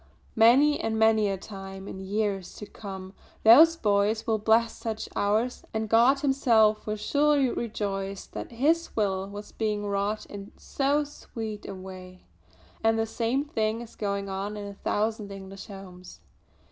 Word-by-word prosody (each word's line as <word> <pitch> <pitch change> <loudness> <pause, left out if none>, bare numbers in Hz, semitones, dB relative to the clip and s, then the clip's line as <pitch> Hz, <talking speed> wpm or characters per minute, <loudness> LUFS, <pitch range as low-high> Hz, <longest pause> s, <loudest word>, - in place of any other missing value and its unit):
Many 260 +7 +5
and 220 0 -1
many 220 -1 +4
a 195 - -2
time 195 0 -9
in 190 - -7
years 195 -1 -2
to 210 - -8
come 190 -2 -9 0.3
those 310 +9 +8
boys 210 -2 +1
will 220 -1 +1
bless 225 +2 +3
such 220 -1 -4
hours, 220 +5 0
and 220 0 -1
God 240 +6 +4
Himself 225 -7 +3
will 215 - -1
surely 285 +4 +2
rejoice 200 -3 -3
that - - -8
His 320 +8 +1
will 195 -2 0
was 205 +1 -9
being 210 -2 -2
wrought 200 +1 -1
in 200 0 -10
so 285 +2 0
sweet 225 -7 -7
a 195 - -6
way. 185 -1 -11 0.6
And 225 0 +3
the 225 - +1
same 235 +5 -1
thing 220 -5 -1
is 235 - -11
going 200 -1 -2
on 195 +2 -4
in 205 - -6
a 200 - -7
thousand 210 +1 -2
English 195 0 -9
homes!" 185 -2 -11
215 Hz, 160 wpm, -27 LUFS, 200-230 Hz, 0.6 s, those